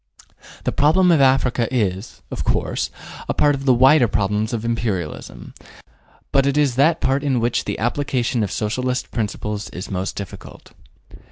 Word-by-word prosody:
The - - 0
problem 175 +5 +4
of 160 -4 +4
Africa 130 -3 +3
is, 105 -5 -2
of - - -4
course, - - -1 0.4
a - - 0
part 145 0 +3
of 135 -1 -5
the 130 - +5
wider 130 +1 +5
problems 105 +1 -1
of 115 -2 -3
Imperialism, 110 -9 -4 0.8
but 135 0 +3
it 140 +1 +1
is 145 -4 +3
that 155 +5 +3
part 135 +2 +1
in 135 -4 +1
which 120 +1 0
the - - -3
application 120 -1 -1
of 105 - -2
Socialist 125 +4 -2
principles 105 -2 -3
is 90 - -8
most 95 0 -3
difficult. 100 -2 -9
120 Hz, 160 wpm, -21 LUFS, 105-135 Hz, 0.8 s, the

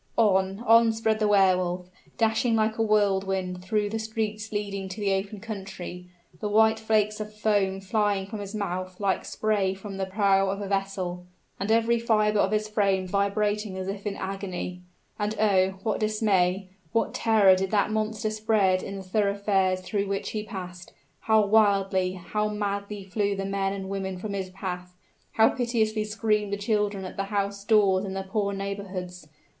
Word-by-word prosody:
On 195 -2 +2
on 230 0 +6
sped 220 -1 0
the 215 - +2
Wehr 195 -2 +5
Wolf, 180 0 -3 0.3
dashing 225 +1 +2
like 220 0 +1
a - - +3
whirlwind 195 -4 +1
through 210 +2 0
the 225 +2 -3
streets 220 -1 -3
leading 200 -2 -3
to 185 +3 -7
the 200 -2 +1
open 195 +2 -3
country, 190 -4 -7 0.3
the 210 - -2
white 220 +1 +4
flakes 215 -1 +1
of 215 0 -5
foam 205 -3 +1
flying 200 0 0
from 210 +2 -7
his 200 +1 -6
mouth 185 -2 -4
like 200 -2 0
spray 205 -3 0
from 195 0 -8
the 190 -1 -2
prow 195 0 +2
of 195 +1 -2
a 200 - -4
vessel, 190 -2 -2 0.3
and 195 +2 -2
every 230 +1 +3
fiber 215 -2 +2
of 195 - +3
his 215 0 0
frame 195 -3 +1
vibrating 205 +1 0
as 185 0 -4
if 200 +1 -4
in 200 - -2
agony. 190 -2 -5 0.4
And 210 +1 -1
oh! 190 -3 +3
what 215 - 0
dismay 195 -3 +1 0.2
what 230 - +1
terror 215 -4 +5
did 190 +1 -1
that 210 0 +2
monster 215 0 -1
spread 215 -4 +2
in 195 - -6
the 195 - -6
thoroughfares 200 -1 +1
through 200 +2 -2
which 195 0 -2
he 215 - -2
passed; 180 -3 -8 0.3
how 220 -1 +3
wildly, 195 -3 +3
how 210 +4 -2
madly 200 -1 -3
flew 200 +1 -1
the 195 0 -3
men 195 0 -1
and 195 -1 -5
women 190 -1 -3
from 200 +2 -5
his 190 -2 -3
path; 180 -1 -6 0.4
how 220 0 +5
piteously 225 -4 0
screamed 210 -1 0
the 200 - -1
children 205 -2 -1
at 185 - -8
the 195 - -1
house 200 0 -2
doors 200 -3 +4
in 190 -1 -4
the 195 - -3
poor 200 +1 -1
neighborhoods! 195 -3 -5
200 Hz, 180 wpm, -26 LUFS, 190-215 Hz, 0.4 s, on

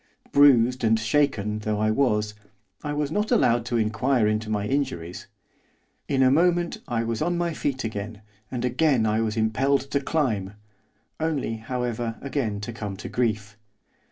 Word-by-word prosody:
Bruised 125 -3 +5
and 110 0 +3
shaken 110 -3 +1
though 105 0 -2
I 110 0 +2
was, 105 -4 +1 0.5
I 150 - -3
was 145 0 -1
not 210 +5 0
allowed 120 - +3
to 120 - 0
inquire 115 +2 +1
into 110 0 0
my 105 -1 -1
injuries. 105 -11 -3 0.8
In 135 -1 +2
a 130 - +5
moment 175 +3 +2
I 115 -3 -1
was 115 -1 -3
on 175 +2 0
my 170 -1 -1
feet 135 -3 -2
again, 110 -1 -5 0.3
and 125 -1 -3
again 125 -1 +2
I 110 +1 +1
was 110 0 -2
impelled 130 +5 +2
to 140 - +2
climb, 115 -10 -1 0.6
only, 150 -8 -1
however, 120 0 -3
again 130 -7 -2
to 120 +3 -5
come 105 -3 -5
to - - -7
grief. 110 -3 -2
120 Hz, 160 wpm, -25 LUFS, 110-140 Hz, 0.8 s, Bruised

